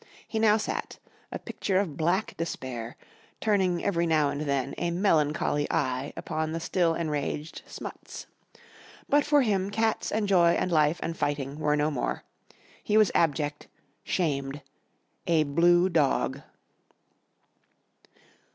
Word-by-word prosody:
He 220 - -2
now 215 -1 +5
sat, 215 - -4 0.3
a - - -3
picture 190 -2 -2
of 175 -8 -2
black 175 +7 0
despair, 130 -8 -5 0.4
turning 190 -5 +1
every 170 -4 +1
now 155 -3 +2
and 145 - -4
then 140 -2 -1
a 175 - 0
melancholy 155 -5 +1
eye 130 0 -1
upon 155 0 -3
the 165 - -2
still 165 0 +1
enraged 150 -1 -3
Smuts. - - -8 0.8
But 290 0 +3
for 295 -2 +4
him 195 -4 0
cats 220 +2 0
and 215 -1 0
joy 175 -3 +5
and 185 - -1
life 155 0 +3
and 165 - -3
fighting 145 -1 -2
were 150 -1 +2
no 150 +1 +1
more. 130 - -2 0.6
He 210 - +2
was 215 -4 +5
abject, 150 -2 0 0.4
shamed 140 -5 -2 0.6
a 165 -2 +4
blue 175 +5 +4
dog. 145 -4 +1
165 Hz, 135 wpm, -27 LUFS, 145-185 Hz, 0.8 s, now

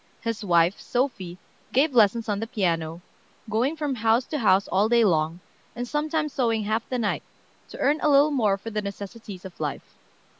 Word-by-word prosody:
His 230 -2 -3
wife, 170 0 +3
Sophie, 215 -9 -2 0.3
gave 275 +3 +2
lessons 225 0 +4
on 205 -2 -1
the 225 - -3
piano, 170 -7 -1 0.5
going 235 +8 0
from 295 -3 -2
house 230 +1 +2
to 300 - -3
house 195 -4 +3
all 205 +3 +2
day 235 -1 +4
long, 165 -1 +1 0.3
and 245 +1 -4
sometimes 300 +1 -1
sewing 230 -4 +1
half 215 +2 0
the 255 - -1
night, 215 -4 -1 0.5
to - - -10
earn 295 +3 +2
a 305 - +3
little 285 +1 +5
more 215 -8 +2
for 225 +3 -8
the 210 0 -1
necessities 200 -1 -8
of 185 - -11
life. 150 -2 -5
220 Hz, 185 wpm, -25 LUFS, 195-255 Hz, 0.5 s, little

